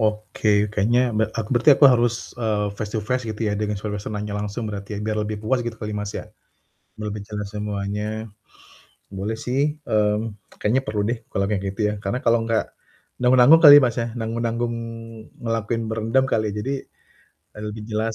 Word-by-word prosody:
Oke, 105 -1 +1
kayaknya 110 +4 +2 0.2
be 110 - +3
aku 110 -2 -4
berarti 125 +6 +5
aku 140 - +5
harus, 120 -2 +1
eee, 105 -3 0
face-to-face 110 +4 -2
gitu 105 - -12
ya 105 - -1
dengan 105 -1 -2
suasananya 105 0 -4
langsung 105 +2 -3
berarti 100 0 -6
ya, 105 - -3
biar 105 0 -2
lebih 105 0 -4
puas 120 +3 0
gitu 120 - -3
kali, 105 -1 -4
Mas 105 0 -4
ya. - - -6 0.7
Lebih 105 -1 -4
jelas 105 -1 -5
semuanya. 105 +1 -3 0.9
Boleh 100 +3 -3
sih, 135 +6 0
mmm, 105 -1 +1 0.3
kayaknya 125 +6 +2
perlu 105 -1 -1
deh 120 - -1
kalau 100 - -1
kayak 100 -2 0
gitu - - -8
ya, - - -2
karena 105 +6 -3
kalau 115 0 +4
enggak 115 -1 0 0.5
nanggung-nanggung 125 +5 +7
kali, 145 -1 +12
Mas, 120 -3 +1
ya, 115 0 -1
nanggung-nanggung 115 0 -2 0.7
ngelakuin 115 0 -1
berendam 115 +4 +1
kali, 110 -1 +2
jadi, 115 +6 -2 0.8
e - - -12
lebih 105 0 -5
jelas 110 +1 -1
110 Hz, 170 wpm, -23 LUFS, 105-120 Hz, 0.9 s, kali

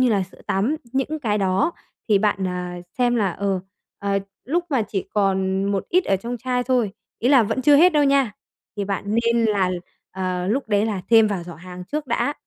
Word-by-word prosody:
như 255 - +4
là 200 -3 +2
sữa 185 - -12
tắm 220 +11 +1 0.2
những 270 +4 -1
cái 210 -5 0
đó 195 - +1 0.4
thì 205 -2 +5
bạn, 200 -2 +1
ờ, 180 -1 -4 0.2
xem 245 -1 +3
là, 200 -5 +1
ờ, 195 0 -1 0.4
ờ, 200 0 0 0.3
lúc 340 +7 0
mà 265 -6 +2
chỉ 200 -2 -4
còn 190 -1 +1
một 200 -1 -1
ít 365 +1 +3
ở 195 - +2
trong 235 +5 -5
chai 250 +1 -1
thôi, 245 -5 +1 0.3
ý 245 - +1
là 270 -4 +6
vẫn 260 +5 -1
chưa 290 +2 +6
hết 355 +4 +6
đâu 295 -1 +4
nha, 275 -5 +3 0.4
thì 205 - -1
bạn 200 0 -3
nên 230 +2 +2
là, 200 -4 +2 0.4
ờ, 185 -1 -2
lúc 255 +1 -1
đấy 205 +1 +2
là 200 -4 -2
thêm 225 -1 +7
vào 200 -4 -2
giỏ 170 -1 -9
hàng 180 +1 -10
trước 300 +6 -4
đã, 255 +4 0
210 Hz, 215 wpm, -22 LUFS, 190-255 Hz, 0.4 s, thêm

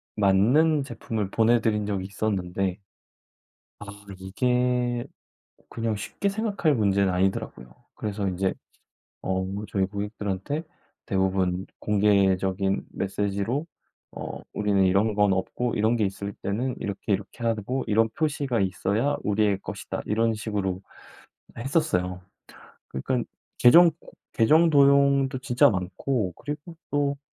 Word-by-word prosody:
맞는 125 +10 +3
제품을 110 -5 -4
보내 115 +1 +3
드린 105 -2 0
적이 95 -2 -2
있었는데 95 -2 -2 1.0
아 105 - -8 0.3
이게 125 +4 0 0.7
그냥 115 -2 -2
쉽게 200 - -3
생각할 200 -7 0
문제는 100 -4 +2
아니더라고요. 90 -9 -2 0.2
그래서 100 -2 -3
인제 95 +1 0 0.7
어 95 0 -1 0.2
저희 95 -1 0
고객들한테 105 - -4 0.4
대부분 95 -2 0
공개적인 100 -2 +2
메시지로 100 - -2 0.5
어 - - -6
'우리는 100 -2 +2
이런 100 +3 +2
건 105 -1 +3
없고 120 +6 -2
이런 110 +3 +2
게 110 - +1
있을 100 +1 -5
때는 120 +6 -2
이렇게 100 +1 -3
이렇게 100 +5 -3
하고 115 +3 -1
이런 110 +2 +3
표시가 140 -6 -1
있어야 100 +9 0
우리의 105 -1 +2
것이다.' - - -6
이런 115 +2 +1
식으로 100 -4 -3 0.8
했었어요. 90 - 0 0.7
그러니깐 120 - -2 0.3
계정 165 +7 +8 0.4
계정 155 +9 +5
도용도 140 -2 +4
진짜 130 +2 +4
많고 95 +2 -2
그리고 150 +3 -7 0.2
또 140 -1 +1
105 Hz, 270 characters per minute, -26 LUFS, 95-125 Hz, 1.0 s, 계정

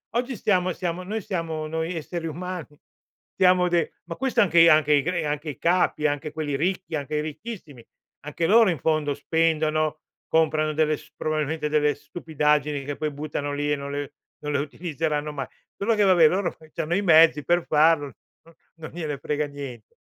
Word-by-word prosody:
oggi 245 +2 -1
stiamo 185 -3 +1
siamo 180 0 -3
noi 215 +3 -4
siamo, 165 -4 -3
noi 160 +2 -3
esseri 165 +1 -5
umani 175 -1 -5 0.7
siamo 180 -1 +4
de 170 -1 0
ma 170 0 -6
questo 255 -2 +1
anche 170 -4 +4
i 165 - +8
anche 155 -2 +5
i 145 - +4
gre 175 0 -1
anche 150 +1 -3
i 140 - -6
capi, 170 -3 +2
anche 145 +1 -3
quelli 150 -3 -3
ricchi, 170 +2 -2
anche 145 0 -3
i 150 - +1
ricchissimi, 155 - -8 0.4
anche 150 +3 -2
loro 225 +1 +6
in 165 - -4
fondo 155 0 0
spendono, 155 0 0 0.3
comprano 155 -1 +2
delle 155 0 +1
s 155 +1 -17
probabilmente 155 0 -2
delle 150 -1 +2
stupidaggini 150 -2 -1
che 145 +1 -4
poi 155 -1 -2
buttano 145 0 -4
lì 145 +1 -1
e 145 - +3
non 140 0 -6
le 145 0 -4 0.3
non 150 - -2
le 140 - +2
utilizzeranno 150 0 -3
mai. 140 -3 -4 0.3
Solo 225 +3 +1
che 210 - +1
vabbè, 180 -5 +6
loro 180 +1 -1 0.2
c'hanno 170 +3 -1
i 200 - 0
mezzi 160 -4 +6
per 175 0 +2
farlo, 155 -2 +3 0.3
no 165 0 -20 0.2
non 160 -1 -8
gliene 155 -5 -4
frega 150 +1 -1
niente. 135 -6 -9
155 Hz, 185 wpm, -24 LUFS, 150-175 Hz, 0.7 s, i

